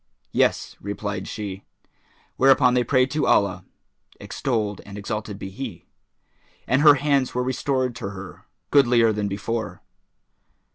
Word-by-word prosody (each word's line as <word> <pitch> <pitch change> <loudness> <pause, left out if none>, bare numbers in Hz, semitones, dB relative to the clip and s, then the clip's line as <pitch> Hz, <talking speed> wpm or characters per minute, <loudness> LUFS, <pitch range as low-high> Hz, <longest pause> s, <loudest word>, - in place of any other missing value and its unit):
"Yes," - - 0
replied 100 +1 -4
she: 100 -2 -6 0.7
whereupon 130 -1 +5
they 125 -1 +3
prayed 130 +1 +2
to 150 - 0
Allah 100 - +2 0.5
(extolled 110 -6 -2
and 100 0 -10
exalted 105 0 -5
be 95 -1 -7
He!) 120 +3 -7 0.8
and 130 +3 +2
her 150 -1 +8
hands 140 -2 +1
were 125 - +1
restored 130 -1 -1
to 100 - -5
her, 95 -1 -10 0.3
goodlier 120 -5 +4
than 105 -1 -2
before. 110 +3 -4
115 Hz, 130 wpm, -23 LUFS, 100-130 Hz, 0.8 s, her